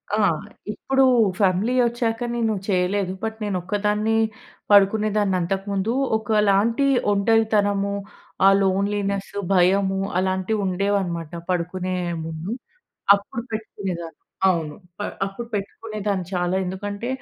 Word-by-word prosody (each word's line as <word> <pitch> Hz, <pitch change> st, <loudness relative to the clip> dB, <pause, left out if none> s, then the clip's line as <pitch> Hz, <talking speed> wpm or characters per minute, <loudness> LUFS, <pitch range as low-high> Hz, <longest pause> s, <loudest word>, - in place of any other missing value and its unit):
ఆ! -, -, 0 dB, 0.6 s
ఇప్పుడు 270 Hz, +4 st, +2 dB, 0.3 s
ఫ్యామిలీ 200 Hz, +5 st, +2 dB
వచ్చాక 235 Hz, -1 st, -1 dB, 0.2 s
నేను 225 Hz, -2 st, +1 dB
చేయలేదు. 185 Hz, 0 st, +1 dB
బట్ 220 Hz, 0 st, -3 dB
నేను 200 Hz, -3 st, -1 dB
ఒక్కదాన్ని 210 Hz, +3 st, 0 dB, 0.6 s
పడుకునేదాన్ని 205 Hz, 0 st, +4 dB
అంతకు 190 Hz, +3 st, -2 dB
ముందు. 200 Hz, +4 st, 0 dB, 0.2 s
ఒకలాంటి 215 Hz, +3 st, +2 dB, 0.3 s
ఒంటరితనము 205 Hz, -1 st, +2 dB, 0.5 s
ఆ -, -, +9 dB
లోన్లీనెస్, 200 Hz, +1 st, 0 dB, 0.2 s
భయము 190 Hz, +1 st, +3 dB, 0.2 s
అలాంటివి 190 Hz, +3 st, 0 dB
ఉండేవనమాట 185 Hz, -4 st, -1 dB, 0.2 s
పడుకునే 185 Hz, +1 st, -1 dB, 0.3 s
ముందు. 160 Hz, +4 st, -5 dB, 0.6 s
అప్పుడు 205 Hz, +3 st, -4 dB
పెట్టుకునేదాన్ని. 185 Hz, -7 st, -5 dB, 0.3 s
అవును. 160 Hz, -5 st, 0 dB, 0.2 s
ప -, -, -14 dB, 0.3 s
అప్పుడు 230 Hz, +4 st, -7 dB
పెట్టుకునేదాన్ని 205 Hz, -2 st, -3 dB
చాలా. 180 Hz, +1 st, 0 dB
ఎందుకంటే, 205 Hz, +5 st, -4 dB
200 Hz, 100 wpm, -23 LUFS, 185-215 Hz, 0.6 s, ఆ